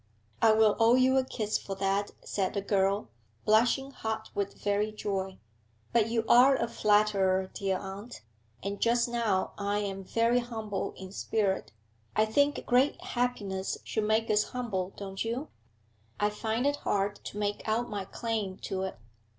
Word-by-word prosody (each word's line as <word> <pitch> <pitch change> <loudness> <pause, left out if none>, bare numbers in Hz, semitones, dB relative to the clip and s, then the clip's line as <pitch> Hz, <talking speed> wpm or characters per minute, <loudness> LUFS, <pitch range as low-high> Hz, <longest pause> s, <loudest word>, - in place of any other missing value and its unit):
'I 220 - +6
will 215 -1 +4
owe 230 +2 +6
you 255 +1 +4
a 265 - +4
kiss 215 -4 -2
for 195 - -6
that,' 195 +1 0
said 190 -1 -2
the 200 - 0
girl, 195 - +1 0.4
blushing 245 +5 +3
hot 220 -3 -4
with 200 0 -2
very 205 +1 0
joy. 195 -3 -3 0.6
'But 225 -2 +3
you 225 -1 0
are 260 +3 +7
a 260 - 0
flatterer, 200 -4 +2
dear 195 -2 -1
aunt, 195 - -8 0.4
and 200 +1 -4
just 235 +1 +3
now 230 -6 0
I 200 0 0
am 195 -2 -3
very 230 +5 +2
humble 220 -4 -4
in 190 0 -9
spirit. 200 -1 -1 0.4
I 215 - +4
think 285 +7 +1
great 255 +3 +3
happiness 205 -6 -2
should 220 -1 -1
make 220 +1 +2
us 210 0 +3
humble, 200 -7 -3
don't 195 -1 -4
you? 240 +6 -3 0.7
I 210 0 +2
find 225 +4 -1
it 285 0 +2
hard 200 -3 0
to - - -6
make 205 0 -1
out 230 +3 +1
my 205 -3 -4
claim 215 -4 -3
to 190 -1 -2
it.' 190 -7 -4
210 Hz, 165 wpm, -30 LUFS, 195-235 Hz, 0.7 s, are